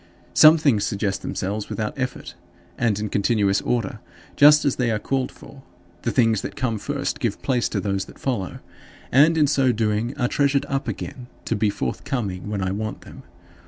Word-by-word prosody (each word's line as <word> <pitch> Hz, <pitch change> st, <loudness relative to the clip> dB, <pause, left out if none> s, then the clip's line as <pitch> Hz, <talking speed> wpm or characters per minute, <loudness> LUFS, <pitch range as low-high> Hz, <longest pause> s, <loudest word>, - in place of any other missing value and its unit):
Some 155 Hz, +1 st, +8 dB
things 135 Hz, -10 st, +2 dB
suggest 100 Hz, -1 st, -2 dB
themselves 100 Hz, +2 st, -3 dB
without 110 Hz, -1 st, -3 dB
effort, 130 Hz, -2 st, -4 dB, 0.4 s
and 115 Hz, -4 st, +1 dB
in 105 Hz, -, -2 dB
continuous 100 Hz, -1 st, +1 dB
order, 120 Hz, -2 st, -2 dB, 0.4 s
just 150 Hz, +1 st, +7 dB
as 140 Hz, -, +1 dB
they 125 Hz, -2 st, +1 dB
are 110 Hz, -, +1 dB
called 130 Hz, +4 st, -2 dB
for 135 Hz, -, -14 dB, 0.4 s
the -, -, -1 dB
things 115 Hz, -4 st, +2 dB
that -, -, -6 dB
come 115 Hz, -4 st, -1 dB
first 140 Hz, +5 st, -3 dB
give 115 Hz, -7 st, -2 dB
place 125 Hz, -3 st, +1 dB
to -, -, -2 dB
those 100 Hz, -2 st, -2 dB
that -, -, -15 dB
follow, 110 Hz, -9 st, -3 dB, 0.5 s
and 155 Hz, +5 st, +5 dB
in 150 Hz, -, +5 dB
so 135 Hz, -3 st, +2 dB
doing 110 Hz, +3 st, -1 dB
are 125 Hz, -3 st, +1 dB
treasured 140 Hz, +1 st, +1 dB
up 135 Hz, 0 st, -2 dB
again 125 Hz, -2 st, -6 dB, 0.2 s
to -, -, -1 dB
be 105 Hz, +1 st, +1 dB
forthcoming 105 Hz, -4 st, -3 dB
when 100 Hz, -2 st, -2 dB
I 95 Hz, -, -1 dB
want 110 Hz, +2 st, -4 dB
them. 135 Hz, -, -12 dB
120 Hz, 185 wpm, -23 LUFS, 105-135 Hz, 0.5 s, Some